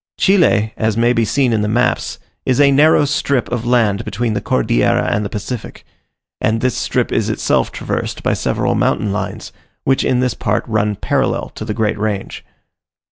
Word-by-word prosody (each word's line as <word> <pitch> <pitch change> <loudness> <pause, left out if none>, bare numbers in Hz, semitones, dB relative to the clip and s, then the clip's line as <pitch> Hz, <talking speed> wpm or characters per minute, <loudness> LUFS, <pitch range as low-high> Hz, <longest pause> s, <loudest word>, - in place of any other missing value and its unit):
Chile, 115 - +3
as 110 -1 0
may 120 +1 +3
be 115 - +1
seen 125 +2 +1
in 110 - +1
the 105 - 0
maps, 120 +3 0 0.3
is 130 0 +1
a 140 -1 +6
narrow 150 +2 +5
strip 140 -2 0
of 120 -1 -2
land 115 -4 +2
between 115 +2 -2
the 105 - -2
Cordillera - - +1
and 105 - 0
the 100 - -4
Pacific; 110 +2 -6 0.5
and 110 +1 +1
this 125 -1 0
strip - - -1
is - - 0
itself - - 0
traversed - - -4
by - - +1
several - - 0
mountain 105 -1 0
lines, 100 -1 -5 0.3
which 135 0 +2
in 125 -1 +1
this 125 -1 +1
part 105 -1 -1
run 105 -2 0
parallel - - -1
to - - -8
the 105 -1 -4
great 105 -2 -1
range. 105 -2 -3
115 Hz, 185 wpm, -17 LUFS, 105-125 Hz, 0.5 s, a